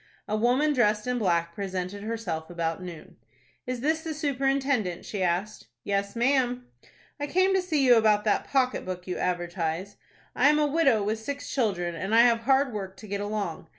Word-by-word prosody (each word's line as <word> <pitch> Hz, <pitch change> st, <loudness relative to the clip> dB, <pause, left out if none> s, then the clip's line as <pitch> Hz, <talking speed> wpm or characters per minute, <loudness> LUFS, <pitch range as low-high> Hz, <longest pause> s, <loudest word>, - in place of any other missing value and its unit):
A 210 Hz, -, -1 dB
woman 250 Hz, +7 st, +2 dB
dressed 210 Hz, -5 st, +2 dB
in 250 Hz, 0 st, -1 dB
black 170 Hz, -4 st, +1 dB
presented 190 Hz, +1 st, -4 dB
herself 205 Hz, -8 st, -4 dB
about 165 Hz, 0 st, -3 dB
noon. 175 Hz, -3 st, -10 dB, 0.5 s
"Is 250 Hz, -1 st, -3 dB
this 315 Hz, +3 st, +1 dB
the 320 Hz, -1 st, -5 dB
superintendent?" 270 Hz, -, 0 dB
she 205 Hz, -, -4 dB
asked. 185 Hz, -, -1 dB, 0.2 s
"Yes, 200 Hz, +1 st, -1 dB
ma'am." 250 Hz, 0 st, +1 dB, 0.5 s
"I 290 Hz, -, -2 dB
came 370 Hz, +5 st, +2 dB
to 380 Hz, -, +3 dB
see 310 Hz, -7 st, +1 dB
you 250 Hz, -, +7 dB
about 215 Hz, -2 st, +4 dB
that 210 Hz, -, +1 dB
pocket 260 Hz, -2 st, +1 dB
book 180 Hz, -1 st, -6 dB
you 180 Hz, -, -4 dB
advertise. 175 Hz, +1 st, -2 dB, 0.4 s
I 270 Hz, +4 st, +5 dB
am 300 Hz, -, +4 dB
a 300 Hz, -, +3 dB
widow 275 Hz, -8 st, +3 dB
with 215 Hz, +2 st, -1 dB
six 280 Hz, +5 st, -5 dB
children, 190 Hz, -9 st, 0 dB
and 195 Hz, +6 st, -2 dB
I 230 Hz, -, +8 dB
have 235 Hz, -1 st, +4 dB
hard 265 Hz, +2 st, +2 dB
work 195 Hz, -2 st, -6 dB
to 215 Hz, -, -11 dB
get 200 Hz, 0 st, -3 dB
along. 205 Hz, -6 st, -4 dB
215 Hz, 185 wpm, -27 LUFS, 185-265 Hz, 0.5 s, I